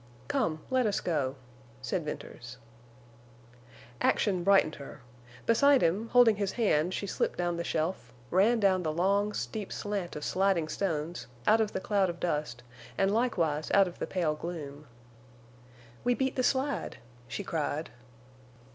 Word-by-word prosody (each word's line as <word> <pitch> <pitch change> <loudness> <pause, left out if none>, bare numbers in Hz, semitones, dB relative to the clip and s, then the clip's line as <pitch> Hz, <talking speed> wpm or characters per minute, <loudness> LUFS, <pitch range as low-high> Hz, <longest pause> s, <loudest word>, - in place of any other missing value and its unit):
"Come, 170 - 0
let 255 -3 +3
us 205 - 0
go," 145 -6 -1 0.4
said 130 +7 -2
Venters. 125 -4 -7 1.4
Action 185 -4 +2
brightened 195 -5 +4
her. 140 0 -10 0.4
Beside 275 +4 +5
him, 195 +8 +1
holding 235 -3 +5
his 200 -2 -1
hand 180 -8 +2
she - - -3
slipped 195 - -1
down 175 -1 0
the 170 - -3
shelf, 160 -6 -2 0.2
ran 215 +6 +4
down 190 -3 +3
the 160 -3 -1
long, 200 +5 +1
steep 210 -1 -4
slant 200 -4 -3
of 150 - -6
sliding 190 -4 +1
stones, 165 -2 -3 0.2
out 225 +1 +5
of 215 -1 0
the - - -1
cloud 195 -1 +1
of 170 0 -6
dust, 150 -8 -2 0.3
and 195 +1 +2
likewise 170 -11 0
out 195 -1 +6
of 175 - -9
the - - -3
pale 170 -5 0
gloom. 150 -3 -7 1.2
"We 245 0 +2
beat 265 +1 -1
the 255 - +1
slide," 270 +2 0 0.3
she 115 -1 -4
cried. 155 0 -2
185 Hz, 150 wpm, -30 LUFS, 155-210 Hz, 1.4 s, out